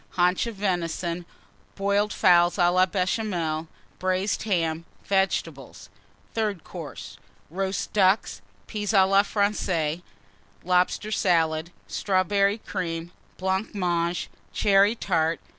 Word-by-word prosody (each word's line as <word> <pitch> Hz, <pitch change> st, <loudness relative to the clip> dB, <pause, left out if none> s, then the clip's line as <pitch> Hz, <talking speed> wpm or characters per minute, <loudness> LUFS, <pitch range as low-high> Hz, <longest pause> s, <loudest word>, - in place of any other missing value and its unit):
Haunch 180 Hz, +5 st, +2 dB
of 230 Hz, -, -5 dB
Venison. 175 Hz, -3 st, -2 dB, 0.5 s
Boiled 200 Hz, +1 st, +1 dB
Fowls 175 Hz, -2 st, +4 dB
à 175 Hz, 0 st, +3 dB
la 185 Hz, +1 st, +4 dB
Béchamel. 180 Hz, -5 st, -1 dB, 0.3 s
Braised 185 Hz, +2 st, 0 dB
Ham. 165 Hz, -5 st, 0 dB, 0.2 s
Vegetables. 195 Hz, -1 st, -1 dB, 0.4 s
THIRD 210 Hz, -6 st, -1 dB
COURSE. 100 Hz, -, -9 dB, 0.3 s
Roast 190 Hz, +2 st, -3 dB
Ducks. 190 Hz, -, +2 dB, 0.2 s
Peas 210 Hz, 0 st, -3 dB
à 190 Hz, -2 st, +6 dB
la 195 Hz, +1 st, +5 dB
Française. 185 Hz, -6 st, 0 dB, 0.6 s
Lobster 180 Hz, +4 st, +1 dB
Salad. 165 Hz, -5 st, +1 dB, 0.2 s
Strawberry 200 Hz, +1 st, +1 dB
Cream. 175 Hz, -5 st, -4 dB, 0.3 s
Blancmange. 180 Hz, -3 st, -1 dB, 0.2 s
Cherry 200 Hz, +2 st, +4 dB
Tart. 165 Hz, -6 st, 0 dB
185 Hz, 100 wpm, -25 LUFS, 170-200 Hz, 0.6 s, à